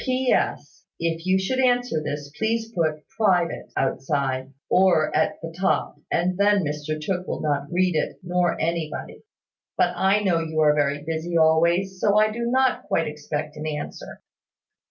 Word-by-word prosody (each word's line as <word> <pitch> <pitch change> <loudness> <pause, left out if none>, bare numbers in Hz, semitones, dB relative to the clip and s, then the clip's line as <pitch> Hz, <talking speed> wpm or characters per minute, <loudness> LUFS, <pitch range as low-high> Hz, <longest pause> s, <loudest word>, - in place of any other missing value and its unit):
"PS. 255 -1 0 0.2
If 165 +1 -2
you 185 0 +4
should 195 +8 -1
answer 245 -9 +2
this, 145 -1 -5
please 225 +1 -1
put 155 -6 -1 0.2
`private' 180 -6 +1
outside, 135 -1 -1 0.2
or 180 -4 +3
at - - +1
the 165 0 -6
top; 190 +2 0 0.2
and 180 +2 0
then 205 -1 +4
Mr 150 +1 -3
Tooke 180 +3 -3
will - - -3
not 145 -1 -1
read 180 0 +2
it, 155 - -1
nor 180 0 0
anybody. 165 -1 -3 0.6
But - - +2
I 195 +2 +3
know 185 -5 +2
you 160 -1 -3
are 150 -1 +5
very 145 -1 0
busy 165 +2 -2
always; 170 +4 +3
so 205 +1 +3
I 215 0 +4
do 235 +2 -3
not 260 +1 +1
quite 165 - +1
expect 150 0 -5
an 155 +1 -4
answer." 150 -1 -6
170 Hz, 160 wpm, -24 LUFS, 150-195 Hz, 0.6 s, are